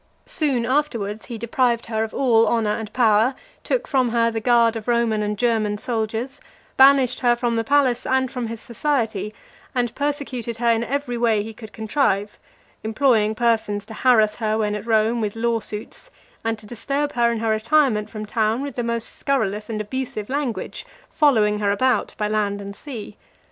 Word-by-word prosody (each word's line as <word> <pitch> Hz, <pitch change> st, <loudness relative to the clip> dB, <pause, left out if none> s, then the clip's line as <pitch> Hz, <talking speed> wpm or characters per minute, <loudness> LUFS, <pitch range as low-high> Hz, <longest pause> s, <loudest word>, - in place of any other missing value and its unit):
Soon 295 Hz, -, 0 dB
afterwards, 235 Hz, -6 st, -1 dB
he 235 Hz, -, -6 dB
deprived 235 Hz, +1 st, 0 dB
her 220 Hz, -1 st, -1 dB
of 220 Hz, -, -4 dB
all 230 Hz, -4 st, +3 dB
honour 225 Hz, -3 st, +1 dB
and 220 Hz, -2 st, -6 dB
power, 230 Hz, +1 st, +3 dB, 0.3 s
took -, -, -1 dB
from 260 Hz, -3 st, +2 dB
her 230 Hz, 0 st, +2 dB
the 225 Hz, -, -2 dB
guard 235 Hz, 0 st, +3 dB
of 225 Hz, 0 st, -6 dB
Roman 235 Hz, -3 st, +1 dB
and 210 Hz, 0 st, -2 dB
German 220 Hz, -3 st, +1 dB
soldiers, 230 Hz, +4 st, -3 dB, 0.4 s
banished 265 Hz, -2 st, +5 dB
her 240 Hz, -1 st, +3 dB
from 240 Hz, -1 st, -1 dB
the 225 Hz, -, 0 dB
palace 270 Hz, -1 st, +2 dB
and 260 Hz, -1 st, +1 dB
from 250 Hz, -3 st, -3 dB
his 230 Hz, 0 st, -6 dB
society, 230 Hz, -4 st, -2 dB, 0.4 s
and 240 Hz, -3 st, 0 dB
persecuted 280 Hz, -5 st, -3 dB
her 235 Hz, 0 st, +2 dB
in 230 Hz, 0 st, +1 dB
every 250 Hz, -2 st, -2 dB
way 225 Hz, -3 st, +2 dB
he 220 Hz, +1 st, -8 dB
could 220 Hz, -1 st, -11 dB
contrive; 215 Hz, -3 st, -1 dB, 0.4 s
employing 220 Hz, -1 st, +2 dB
persons 220 Hz, -3 st, 0 dB
to 220 Hz, -, -10 dB
harass 220 Hz, -3 st, +3 dB
her 220 Hz, -2 st, 0 dB
when 210 Hz, -1 st, 0 dB
at 210 Hz, +2 st, -5 dB
Rome 225 Hz, +1 st, +2 dB
with 210 Hz, -1 st, -2 dB
law 230 Hz, 0 st, 0 dB
suits, 215 Hz, -, -6 dB, 0.3 s
and 225 Hz, 0 st, -1 dB
to 215 Hz, -, -16 dB
disturb 275 Hz, +6 st, -2 dB
her 235 Hz, -1 st, +2 dB
in 230 Hz, -, -2 dB
her 225 Hz, 0 st, -1 dB
retirement 220 Hz, -1 st, +2 dB
from 215 Hz, -1 st, -6 dB
town 220 Hz, +3 st, 0 dB
with 285 Hz, -2 st, -5 dB
the 240 Hz, -, 0 dB
most 235 Hz, -1 st, -2 dB
scurrilous 215 Hz, -7 st, -1 dB
and 220 Hz, -2 st, -3 dB
abusive 215 Hz, -1 st, -4 dB
language, 265 Hz, -9 st, -3 dB, 0.3 s
following 215 Hz, -9 st, +3 dB
her 205 Hz, -1 st, +1 dB
about 255 Hz, +6 st, +1 dB
by 210 Hz, -, 0 dB
land 210 Hz, -1 st, -1 dB
and 200 Hz, 0 st, -8 dB
sea. 225 Hz, -7 st, -8 dB
230 Hz, 185 wpm, -22 LUFS, 215-255 Hz, 0.4 s, banished